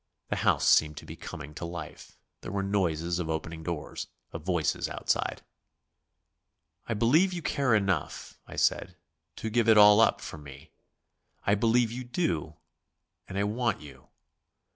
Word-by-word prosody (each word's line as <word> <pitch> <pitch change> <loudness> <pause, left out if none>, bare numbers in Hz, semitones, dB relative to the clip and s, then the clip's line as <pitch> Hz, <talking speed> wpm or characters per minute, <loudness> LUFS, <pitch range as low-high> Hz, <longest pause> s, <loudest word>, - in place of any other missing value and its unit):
The - - -1
house - - +2
seemed 75 -1 +4
to - - -8
be - - -8
coming 75 +2 -8
to 75 - -8
life; 85 -3 -8 0.2
there - - -7
were 100 0 -1
noises 85 -4 0
of 85 -2 -3
opening 80 0 -4
doors, 80 -2 -5 0.2
of 80 - -6
voices 85 -3 0
outside. - - -1 1.4
"I 115 - -1
believe 155 - +3
you 175 -2 -5
care 140 -6 +2
enough," 95 -8 -2
I - - -9
said - - +1 0.4
"to 110 - -5
give 115 0 +2
it 110 - +7
all 105 +1 +8
up - - +4
for 80 - -8
me. 70 +2 -13 0.7
I 100 - +3
believe 115 +2 +3
you 125 +2 -5
do, 85 - -2 0.7
and 95 - -6
I 100 - +2
want 110 +1 0
you." 70 -3 -13
100 Hz, 160 wpm, -28 LUFS, 80-115 Hz, 1.4 s, all